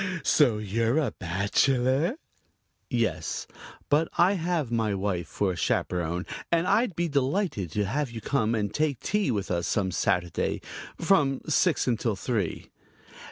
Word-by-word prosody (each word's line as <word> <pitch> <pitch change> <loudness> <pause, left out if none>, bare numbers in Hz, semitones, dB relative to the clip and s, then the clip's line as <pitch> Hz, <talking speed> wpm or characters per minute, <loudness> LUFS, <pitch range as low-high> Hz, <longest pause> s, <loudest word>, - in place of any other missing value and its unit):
So 125 -8 +4
you're 115 +5 0
a 145 -8 +1
bachelor?" 130 - +1 0.7
"Yes, - - -1 0.4
but 155 +3 +2
I 180 +3 +5
have 165 - -1
my 110 -3 +1
wife 95 -3 -2
for 100 -2 -1
a - - -4
chaperon 85 +1 -1 0.3
and 170 0 +3
I'd 205 0 +2
be 175 0 0
delighted 140 - 0
to 105 - 0
have 140 +7 -1
you 115 -1 -6
come 115 -1 0
and 105 -2 -2
take 150 -5 0
tea 205 -4 0
with 105 -6 -1
us 85 -1 0
some 95 -3 0
Saturday 90 -1 0 0.4
from 150 -7 +2
six 160 +1 +2
until 115 -3 0
three." 100 -3 -3
120 Hz, 145 wpm, -27 LUFS, 100-155 Hz, 0.7 s, I